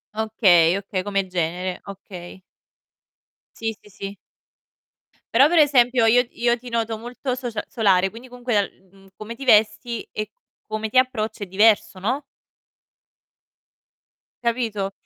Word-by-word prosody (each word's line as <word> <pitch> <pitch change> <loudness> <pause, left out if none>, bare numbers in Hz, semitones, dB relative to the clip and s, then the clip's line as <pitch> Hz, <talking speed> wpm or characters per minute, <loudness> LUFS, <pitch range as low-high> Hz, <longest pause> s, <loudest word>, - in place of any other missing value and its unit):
Okay, 195 -6 +4
okay, 200 -1 -3
come 200 -1 0
genere, 180 +1 -3
okay. 190 -2 -10 1.2
Sì, 225 -1 -3
sì, 210 - -19
sì. 200 +1 -8 1.2
Però, 270 +5 +6
per 345 - +2
esempio, 255 -5 +4
io 235 +2 +5
io 240 0 +1
ti 250 +1 -10
noto 230 -1 -1
molto 245 +3 -4
socia 245 -3 -4
solare, 195 -4 +2
quindi 235 +3 -12
comunque, 245 -4 0
l 190 - -28
mhmm, 195 0 -19
come 215 +2 -8
ti 270 +4 -9
vesti, 220 +1 +2
e 215 0 -4
c - - -50 0.4
come 215 0 -3
ti 255 - +4
approcci 235 -5 -1
è - - -18
diverso, 205 +1 +3
no? 245 +10 -2 2.2
Capito? 225 -5 -1
220 Hz, 135 wpm, -22 LUFS, 195-240 Hz, 2.2 s, Però